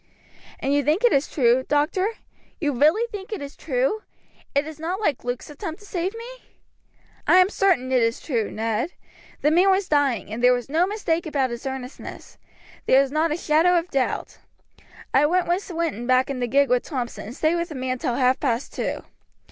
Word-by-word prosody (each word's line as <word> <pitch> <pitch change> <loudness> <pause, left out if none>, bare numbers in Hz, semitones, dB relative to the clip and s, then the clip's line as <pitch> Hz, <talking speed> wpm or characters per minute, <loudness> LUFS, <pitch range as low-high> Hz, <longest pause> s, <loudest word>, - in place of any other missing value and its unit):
"And 275 - -1
you 285 0 +2
think 310 - +1
it 485 - +5
is 275 +1 +2
true, 250 -2 +2
doctor, 325 +9 +1 0.5
you 295 -3 0
really 310 - +3
think 400 -1 -7
it 425 - -3
is 285 0 -8
true? 275 - -1 0.5
It 285 +1 +2
is 310 -1 -9
not 350 +5 -3
like 305 - -1
Luke's 245 0 -4
attempt 315 +4 -6
to - - -14
save 375 +1 -3
me?" - - -9 0.8
"I - - +6
am 370 +1 +6
certain 350 -13 +2
it 255 -2 +3
is 230 +1 +1
true, 235 -8 -2
Ned. 225 +8 -2 0.5
The 300 - +3
man 360 +4 +5
was 385 0 +2
dying, 280 -8 +1
and 235 +2 -5
there 250 0 +7
was 245 +1 -3
no 330 +5 +2
mistake 345 -5 -1
about 275 -5 0
his 235 +3 -5
earnestness. 265 0 -8 0.5
There 265 - +6
is 270 - -5
not 310 +2 +1
a 305 - 0
shadow 340 +2 +3
of 340 +1 -2
doubt. 265 -2 -2 0.7
I 295 +3 +4 0.2
sent 350 +3 +1
Swinton 330 - -3
back 255 +1 +3
in 265 - -4
the 245 - -1
gig 280 +3 +3
with 250 -1 +4
Thompson 245 -8 -5
and 235 - -8
stayed 310 +2 +1
with 340 0 -2
the 310 - -7
man 255 -1 -2
till 240 - -1
half 255 0 +2
past 245 -2 -1
two. - - -3
290 Hz, 205 wpm, -23 LUFS, 255-345 Hz, 0.8 s, there